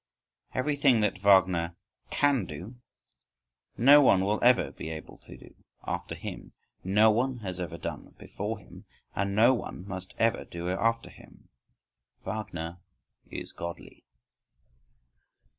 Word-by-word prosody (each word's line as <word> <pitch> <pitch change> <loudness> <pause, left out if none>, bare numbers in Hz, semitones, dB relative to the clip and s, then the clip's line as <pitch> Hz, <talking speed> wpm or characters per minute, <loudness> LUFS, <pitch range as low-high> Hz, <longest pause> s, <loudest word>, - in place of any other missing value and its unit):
Everything 135 -3 +3
that 105 -2 0
Wagner 95 -4 +4 0.3
can 140 -8 +2
do, 100 +8 -8 1.0
no 140 +5 +8
one 95 -8 +4
will 105 +2 +1
ever 125 +1 +4
be - - -7
able 80 -1 -8
to - - -13
do - - -15 0.3
after - - -4
him, - - -8 0.3
no 105 +4 +5
one 125 +4 0
has 95 -3 -5
ever 85 -1 -4
done - - -7
before 105 +3 -5
him, 100 - -15 0.3
and 100 0 -1
no 115 +4 +6
one 100 -6 -6
must 95 -1 -7
ever 115 -1 +2
do 85 0 -7
after 115 +5 0
him. - - -18 0.8
Wagner 90 -6 -5 0.5
is - - -7
godly. 85 0 -8
100 Hz, 125 wpm, -28 LUFS, 90-115 Hz, 1.0 s, no